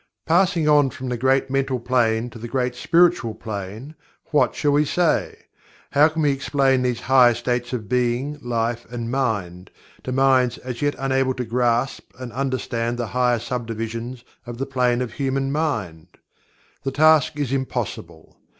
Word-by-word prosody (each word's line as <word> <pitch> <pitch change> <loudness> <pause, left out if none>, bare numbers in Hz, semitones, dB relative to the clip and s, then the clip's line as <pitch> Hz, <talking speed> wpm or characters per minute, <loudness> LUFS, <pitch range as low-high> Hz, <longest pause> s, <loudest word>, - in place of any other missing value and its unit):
Passing 175 -1 +2
on 145 -2 +5
from 130 0 -7
the 125 - -1
Great 130 +2 +1
Mental 135 -2 0
Plane 120 -1 +1
to 115 - -11
the 120 - -6
Great 125 0 -1
Spiritual 165 -4 +2
Plane, 110 +6 -7 0.4
what 150 - +2
shall 145 - +1
we 145 +1 +4
say? 170 +2 0 0.5
How 145 +2 +6
can 160 0 -2
we 145 - +3
explain 135 -1 +1
these 125 -2 -1
higher 125 -3 +5
states 120 +1 -2
of 115 -5 -4
Being, 125 +5 -1
Life 120 0 -2
and 120 -1 -5
Mind, 100 -9 -2 0.3
to 130 - -5
minds 130 -2 +3
as 125 -2 -7
yet 145 0 +1
unable 135 -1 0
to 125 - -3
grasp 120 +2 -1
and 125 -2 -8
understand 120 -3 -2
the 120 - -2
higher 125 -1 +2
subdivisions 115 +1 -5 0.2
of 120 -1 -6
the 135 - -2
Plane 125 -2 +1
of 120 - -7
Human 135 0 -1
Mind? 110 - -2 0.7
The 135 - -2
task 155 0 +4
is 140 -3 -2
impossible. 130 -1 -5
125 Hz, 160 wpm, -22 LUFS, 120-135 Hz, 0.7 s, How